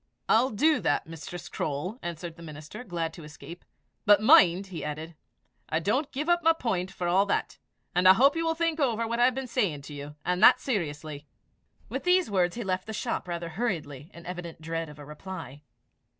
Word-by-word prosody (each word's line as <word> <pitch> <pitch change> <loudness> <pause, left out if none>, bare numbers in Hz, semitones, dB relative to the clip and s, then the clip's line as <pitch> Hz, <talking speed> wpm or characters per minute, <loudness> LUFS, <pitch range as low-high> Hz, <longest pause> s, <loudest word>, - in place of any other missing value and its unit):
"I'll 245 +4 +4
do 300 +8 +3
that, 145 - 0
Mistress 165 +2 -8
Croale," 155 - -3
answered 170 -1 -6
the 170 - -14
minister, 155 +7 -9
glad 170 -6 -3
to 165 - -11
escape. 160 +3 -11 0.4
"But 205 -1 +6
mind," 190 -3 +6
he 185 -4 -7
added, 155 +2 -5 0.6
"I 160 - +1
don't 255 - 0
give 295 +4 -3
up 345 0 +3
my 330 0 +5
point 195 - -2
for 180 -2 -4
all 190 +3 +3
that; - - -1 0.3
and 180 +1 +4
I 185 - +10
hope 275 +9 +4
you 330 - 0
will 325 0 0
think 330 -1 0
over 230 -5 +1
what 235 +1 -2
I 240 - +6
have 255 0 +2
been 265 0 -3
saying 205 - -1
to 145 - -9
you 145 +1 -8
and 180 0 0
that - - +8
seriously." 150 - -3 0.6
With - - -4
these 360 - +3
words 180 -3 +1
he 235 - -4
left 185 0 -2
the 220 - -5
shop 210 - -3
rather 170 -1 -4
hurriedly, 160 - -3
in 170 0 -13
evident 175 -2 -7
dread 165 0 -4
of 150 - -12
a 145 - -10
reply. 150 -2 -8
180 Hz, 210 wpm, -28 LUFS, 160-235 Hz, 0.6 s, I